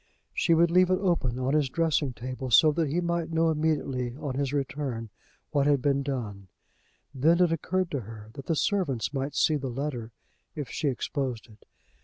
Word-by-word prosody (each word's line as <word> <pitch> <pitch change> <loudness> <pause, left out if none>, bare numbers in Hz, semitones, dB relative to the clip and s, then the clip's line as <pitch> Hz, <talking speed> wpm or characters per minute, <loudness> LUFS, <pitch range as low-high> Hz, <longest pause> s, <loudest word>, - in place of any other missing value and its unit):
She 165 - +3
would 170 +1 +4
leave 180 +1 +5
it 185 - +3
open 170 -11 0
on 130 +2 0
his 150 -3 +2
dressing 155 -2 +1
table 130 +2 -5
so 155 +6 +7
that 160 +1 0
he 165 +5 0
might 170 -1 -1
know 165 0 +3
immediately 145 -6 -1
on 145 -3 -4
his 135 0 -1
return 135 -5 -3 0.4
what 140 -1 +2
had 145 -1 +4
been 140 +1 +1
done. 110 -8 -4 0.7
Then 160 +6 +3
it 180 -2 +4
occurred 180 +3 -1
to 140 - -1
her 110 -1 -10
that 135 - -9
the 165 - +1
servants 150 - 0
might 140 +1 -3
see 155 - +3
the 135 -2 -4
letter 125 -3 -4 0.4
if 145 -3 -5
she 150 - -1
exposed 130 -2 -2
it. 105 - -20
140 Hz, 190 wpm, -28 LUFS, 130-160 Hz, 0.7 s, so